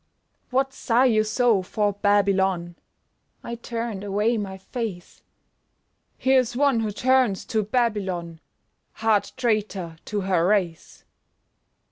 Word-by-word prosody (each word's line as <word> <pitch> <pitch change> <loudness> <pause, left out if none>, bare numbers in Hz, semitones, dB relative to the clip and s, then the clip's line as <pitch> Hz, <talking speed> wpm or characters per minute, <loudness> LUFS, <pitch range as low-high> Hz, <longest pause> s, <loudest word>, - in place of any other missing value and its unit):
"What! 270 +1 0
Sigh 250 0 +2
you 220 -4 +3
so 220 -1 +2
for 205 +2 -1
Babylon?" 195 -4 +1 0.7
(I 235 - -6
turned 230 -3 -5
away 210 +4 +1
my 195 -3 -4
face) 190 -3 -6 1.0
"Here's 260 -2 +2
one 275 -2 +3
who 220 -1 -1
turns 250 -3 +2
to 220 - +3
Babylon, 200 -7 -1 0.5
Heart 220 -2 +1
traitor 210 -8 -1
to 205 -1 -2
her 180 -3 +1
race!" 185 -5 -1
210 Hz, 110 wpm, -24 LUFS, 190-235 Hz, 1.0 s, you